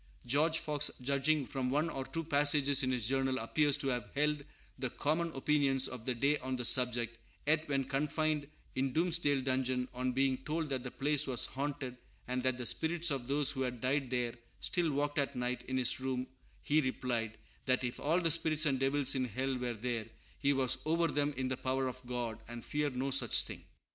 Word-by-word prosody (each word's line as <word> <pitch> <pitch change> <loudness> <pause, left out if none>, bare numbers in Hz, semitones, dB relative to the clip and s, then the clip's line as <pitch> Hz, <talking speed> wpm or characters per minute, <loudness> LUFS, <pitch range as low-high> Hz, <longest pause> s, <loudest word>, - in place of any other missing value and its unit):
George 155 +6 +2
Fox, 150 -2 +1
judging 140 +3 +1
from 130 -1 -2
one 150 +5 +1
or 135 -5 -3
two 165 0 -3
passages 145 -2 +4
in 130 - 0
his 120 -4 0
journal, 135 0 +1
appears 145 +4 +3
to 140 -2 0
have 125 -2 -2
held 150 0 +1 0.4
the 130 - -1
common 160 +6 0
opinions 135 -1 +3
of 125 -2 -8
the 125 - 0
day 140 +5 +2
on 130 0 -3
the 125 -1 -2
subject; 120 -2 +2 0.3
yet 155 +1 +2
when 135 -1 +1
confined 150 +2 -1 0.3
in 130 0 -1
Doomsdale 160 -4 +2
dungeon, 130 -1 0
on 125 +1 -1
being 135 0 +2
told 155 +4 -3
that 130 -2 -1
the 125 - -5
place 145 +2 +1
was 125 -3 +3
haunted 135 -2 -4 0.3
and 125 +1 -1
that 130 -1 0
the 125 - -4
spirits 165 +4 +2
of 130 -3 -3
those 145 +1 +2
who 135 - -3
had 125 -2 -2
died 130 +2 0
there 120 -2 -1 0.3
still 170 -3 0
walked 145 +1 0
at 140 -1 -1
night 125 0 -2
in 130 +1 -1
his 125 -1 +3
room, 130 -1 -2 0.4
he 155 +1 +3
replied, 120 -4 -2 0.3
"that 130 0 +2
if 120 0 -3
all 160 +5 +2
the 165 -2 +2
spirits 155 -1 +2
and 135 -3 +2
devils 135 0 +2
in 130 -2 0
hell 130 +4 -2
were 125 -1 -3
there, 115 -1 -3 0.3
he 140 - +3
was 135 -3 +1
over 165 +1 +2
them 145 0 0
in 130 0 -1
the 130 -1 -2
power 130 0 -1
of 130 0 -6
God, 120 -3 -3
and 120 0 -8
feared 145 -3 -1
no 135 +2 -1
such 135 - +4
thing." - - -9
135 Hz, 205 wpm, -33 LUFS, 125-145 Hz, 0.4 s, passages